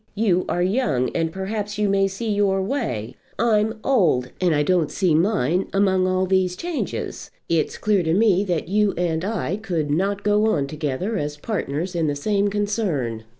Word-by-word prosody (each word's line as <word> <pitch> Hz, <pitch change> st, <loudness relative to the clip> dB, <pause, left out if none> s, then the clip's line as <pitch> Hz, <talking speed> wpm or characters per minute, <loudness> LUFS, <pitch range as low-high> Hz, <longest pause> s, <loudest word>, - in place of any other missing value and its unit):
You 195 Hz, -4 st, +2 dB
are 175 Hz, -, +1 dB
young, 185 Hz, -, +1 dB
and 165 Hz, -1 st, 0 dB
perhaps 205 Hz, +3 st, -4 dB
you 210 Hz, 0 st, +1 dB
may 195 Hz, 0 st, +2 dB
see 205 Hz, +3 st, -3 dB
your 200 Hz, -2 st, +2 dB
way. 190 Hz, -, -3 dB, 0.2 s
I'm 220 Hz, -1 st, +2 dB
old, 165 Hz, -, +2 dB
and 175 Hz, -4 st, +3 dB
I 150 Hz, -, +2 dB
don't 175 Hz, -2 st, +2 dB
see 185 Hz, -5 st, +1 dB
mine 175 Hz, -, +1 dB
among 190 Hz, -2 st, +2 dB
all 185 Hz, 0 st, +1 dB
these 185 Hz, -1 st, +1 dB
changes. 340 Hz, -, -4 dB, 0.2 s
It's 165 Hz, -2 st, 0 dB
clear 210 Hz, -3 st, +2 dB
to 160 Hz, 0 st, +1 dB
me 200 Hz, -2 st, +3 dB
that 175 Hz, -4 st, -1 dB
you 205 Hz, +1 st, +2 dB
and 170 Hz, -2 st, 0 dB
I 200 Hz, -3 st, -2 dB
could 170 Hz, -9 st, -2 dB
not 195 Hz, +6 st, 0 dB
go 210 Hz, +1 st, +3 dB
on 140 Hz, -, 0 dB
together 155 Hz, +8 st, -3 dB
as 150 Hz, 0 st, -4 dB
partners 175 Hz, -2 st, -3 dB
in 165 Hz, -2 st, 0 dB
the 145 Hz, -, 0 dB
same 200 Hz, +7 st, +1 dB
concern. 195 Hz, -, -2 dB
190 Hz, 180 wpm, -22 LUFS, 160-205 Hz, 0.2 s, and